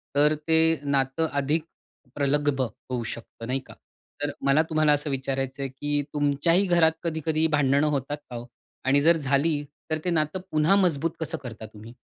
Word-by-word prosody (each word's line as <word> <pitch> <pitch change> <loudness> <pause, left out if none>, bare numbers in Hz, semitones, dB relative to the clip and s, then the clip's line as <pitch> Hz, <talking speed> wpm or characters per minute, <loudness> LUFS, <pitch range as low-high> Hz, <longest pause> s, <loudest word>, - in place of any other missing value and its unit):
तर 150 +1 +4
ते 160 0 +4
नातं 140 +2 +1
अधिक 145 +3 +1 0.5
प्रगल्भ 145 -1 +1
होऊ 125 0 -4
शकत 115 0 -8
नाही 130 +2 0
का? - - -12 0.5
तर 145 0 0
मला 140 +3 +5
तुम्हाला 155 -1 +3
असं 145 +1 -1
विचारायचं 135 0 -2
आहे, 135 - -2
की 145 +2 -1
तुमच्याही 150 +6 +2
घरात 170 -3 +4
कधी-कधी 160 -1 0
भांडणं 140 +1 +3
होतात 145 0 -1
का 125 - -7
हो? 120 - -6 0.4
आणि 140 +2 +4
जर 165 +2 +5
झाली 145 +1 +1 0.3
तर 155 - +2
ते - - +1
नातं 155 +1 0
पुन्हा 155 +5 +4
मजबूत 165 -5 +2
कसं 160 - -2
करता 115 -3 -7
तुम्ही? 110 +2 -12
145 Hz, 170 wpm, -26 LUFS, 135-160 Hz, 0.5 s, मला